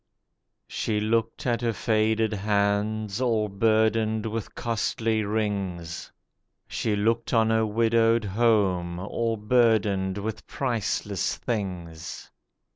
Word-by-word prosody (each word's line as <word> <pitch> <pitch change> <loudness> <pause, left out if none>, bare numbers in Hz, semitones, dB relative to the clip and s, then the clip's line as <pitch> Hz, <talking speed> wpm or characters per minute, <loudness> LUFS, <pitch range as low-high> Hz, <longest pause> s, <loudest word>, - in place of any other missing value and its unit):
She 105 -1 -2
looked 115 +1 -1
at 120 -2 +1
her 115 -1 0
faded 110 0 +1
hands, 105 +1 0
all 115 -4 +1
burdened 110 +1 +2
with 110 0 -4
costly 115 -1 -1
rings; 100 -5 -3 0.6
She 110 -2 -1
looked 115 +3 0
on 110 0 +4
her 110 0 +2
widowed 115 +1 +3
home, 95 -5 +1
all 115 +5 -2
burdened 105 -4 +2
with 105 +1 -5
priceless 120 -6 -1
things. 90 -7 -5
110 Hz, 105 wpm, -26 LUFS, 100-115 Hz, 0.6 s, on